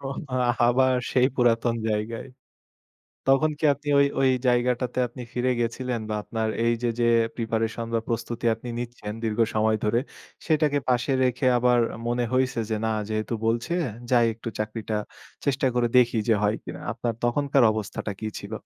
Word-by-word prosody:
ওহো! 135 - -5 0.6
আবার 130 +1 +3 0.2
সেই 125 0 +4
পুরাতন 120 -1 +2
জায়গায়। 110 +3 -3 1.0
তখন 135 +4 +4
কি 155 - -4
আপনি 145 +2 -10
ওই 140 - +6
ওই 135 -1 +4 0.2
জায়গাটাতে 125 0 +1
আপনি 125 +2 -9
ফিরে 125 +1 0
গেছিলেন 120 +1 -2
বা - - -1
আপনার 110 +1 -2 0.2
এই 115 - +3
যে, 120 - +1
যে - - +3 0.3
প্রিপারেশন 115 0 -2
বা 115 - +2
প্রস্তুতি 120 0 -3
আপনি 115 +2 -10
নিচ্ছেন 120 -3 -5
দীর্ঘ 110 0 -1
সময় 110 0 +2
ধরে, 105 +2 +2 0.5
সেটাকে 150 -2 +2
পাশে 125 +2 +1
রেখে 125 +1 0
আবার 125 0 +3 0.3
মনে 120 +1 0
হইছে 130 -2 +1
যে 110 - +1
না - - +1 0.2
যেহেতু 110 +1 -2
বলছে 115 +8 0 0.4
যাই 120 -2 +5
একটু 115 +1 -7
চাকরিটা 110 0 -3 0.5
চেষ্টা 135 -1 +1
করে 120 -1 +2
দেখি 120 -2 +3
যে 115 - +5
হয় 105 +1 +2
কিনা? - - -7
আপনার 120 -1 -3
তখনকার 140 +2 +2
অবস্থাটা 105 0 -4
কি 110 - -3
ছিল? 100 +2 -9
120 Hz, 165 wpm, -25 LUFS, 115-130 Hz, 1.0 s, ওই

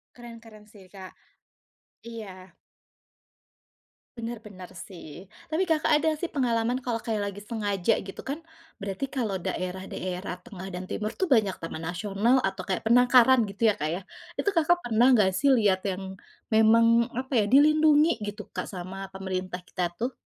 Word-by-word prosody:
Keren 240 -1 -11
keren 215 -2 -15
sih, 205 -3 -16
Kak. 190 -2 -11 0.9
Iya. 190 -6 -10 1.6
Benar 230 -1 -6
benar, 185 -4 -10
sih. 175 -2 -10 0.2
Tapi 320 +4 +1
Kakak 320 -3 +1
ada 315 +1 +2
sih 350 - -2
pengalaman, 240 -4 0
kalau 235 -2 -1
kayak 210 -3 -2
lagi 200 - -10
sengaja 205 -2 0
gitu, 195 - -8
kan, 300 +5 -6 0.3
berarti 200 +6 -4
kalau 220 -9 -2
daerah-daerah 185 0 -4
tengah 190 -5 -8
dan 180 -1 -6
timur 215 +3 -4
tuh, 370 -6 0
banyak 210 -6 +3
taman 165 -1 -7
nasional 200 +7 +1
atau 195 0 -1
kayak 190 +2 -2
penangkaran, 245 +2 +6
gitu 200 +3 -10
ya, - - -10
Kak, 150 - 0
ya. 170 +4 -2 0.4
Itu 405 - 0
Kakak 350 0 +2
pernah 235 +1 +3
nggak 195 -4 +3
sih, 235 +10 +1
lihat 200 -5 +2
yang 190 0 -4 0.4
memang, 230 +1 +5
apa 260 +2 -4
ya, - - +2
dilindungi, 305 0 +5
gitu, 210 0 -6
Kak, - - -4
sama 190 +1 -7
pemerintah 185 -1 -5
kita, 180 -1 -2
tuh? 245 +3 -2
215 Hz, 155 wpm, -27 LUFS, 190-245 Hz, 1.6 s, penangkaran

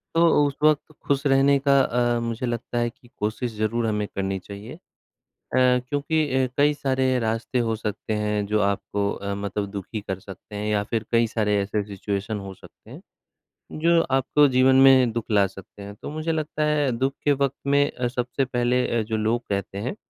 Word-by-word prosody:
तो 165 -3 +5
उस 140 - -5
वक़्त 155 0 +3 0.2
खुश 140 0 +1
रहने 135 +1 +4
का 140 0 +6
अ, 120 -1 +1
मुझे 115 +1 -3
लगता 120 0 -3
है 120 0 +1
कि 120 0 -21
कोशिश 110 +3 -2
ज़रूर 115 +2 0
हमें 105 -1 -1
करनी 95 0 -2
चाहिए 100 +6 -10
अ, 160 - -13 0.8
क्योंकि 130 +5 +2 0.2
अ, - - 0
कई 145 +1 +4
सारे 130 -2 0
रास्ते 115 +2 -1
हो 115 -2 0
सकते 110 0 -4
हैं 105 -1 -1
जो 105 +1 +1
आपको 100 0 0
अ, 100 0 -4
मतलब 100 0 -3
दुःखी 100 +2 -5
कर 95 -2 -5
सकते 95 +2 -12
हैं 105 +1 -3
या 105 - +1
फिर 115 -2 -1
कई 115 0 +4
सारे 105 -2 0
ऐसे 105 +1 -1
सिचुएशन 100 +2 -3
हो 95 -1 -8
सकते - - -18
हैं - - -10 0.8
जो 170 0 +4
आपको 135 +2 +4
जीवन 130 0 +4
में 130 -3 +6
दुःख 115 -1 -3
ला 100 -2 +4
सकते 95 +1 -13
हैं। 100 0 -8
तो - - -8
मुझे 155 +2 -2
लगता 155 -1 -2
है 150 -3 +1
दुःख 135 +2 0
के 145 - +3
वक़्त 140 0 0
में 140 -3 +2
सबसे 125 +2 -1
पहले 125 0 +1
अ, - - +1
जो 110 +1 -2
लोग 110 +3 0
कहते 100 -1 -3
हैं 120 - -3
120 Hz, 195 wpm, -24 LUFS, 105-135 Hz, 0.8 s, का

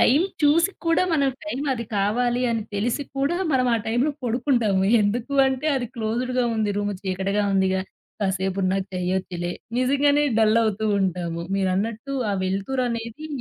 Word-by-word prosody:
Time 275 +6 +5 0.2
చూసి 330 +6 +4 0.2
కూడా, 330 +1 +3
మనం 280 -3 +3 0.2
టైం 285 -2 -3
అది 235 -2 -3
కావాలి 240 +5 +1
అని 230 -2 -1
తెలిసి 230 +7 0
కూడా, 280 +6 +1 0.2
మనం 255 -1 +3
ఆ - - +3
టైంలో 240 +6 +1
పడుకుంటాము. 235 -5 +1 0.2
ఎందుకు 225 +6 -1
అంటే 265 +3 -1
అది 245 -2 -2
క్లోజ్డ్‌గా 245 +3 -1
ఉంది, 215 -1 +1
రూమ్ 205 0 -1
"చీకటిగా 195 +2 -1
ఉందిగా. 190 0 +2 0.4
కాసేపునా 190 0 0
చేయొచ్చులే" 180 -1 -2 0.3
నిజంగానే 280 +3 +3 0.2
డల్ 220 0 +4
అవుతూ 220 0 -1 0.2
ఉంటాము. 175 -3 -2 0.2
మీరన్నట్టు 210 +7 -1 0.2
ఆ - - 0
వెలుతురనేది 230 +6 -2
225 Hz, 140 wpm, -24 LUFS, 195-255 Hz, 0.4 s, టైం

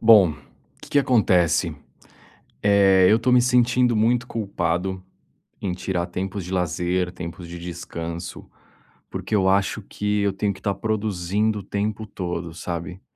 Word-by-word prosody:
Bom, 105 -8 +7 0.5
que - - -12
que 145 - +4
acontece? 100 - +3 0.9
Eh, 100 -2 +5
eu 110 - +5
tô 115 +2 +1
me 125 - +7
sentindo 125 -1 +3
muito 120 +3 +2
culpado 95 -4 -2 0.6
em 95 - -2
tirar 90 -1 -2
tempos 95 +1 -4
de 90 - -7
lazer, 90 0 0
tempos 85 0 -7
de 85 0 -7
descanso, 85 0 -6 0.6
porque 110 - -3
eu 95 -2 +3
acho 100 +2 +1
que 105 +1 -1
eu 100 -1 +1
tenho 100 +1 -1
que - - -14
estar 100 - -1
produzindo 105 0 -1
o - - -9
tempo 105 +2 -3
todo, 85 -4 -5
sabe. 85 +2 -5
95 Hz, 145 wpm, -23 LUFS, 90-110 Hz, 0.9 s, Bom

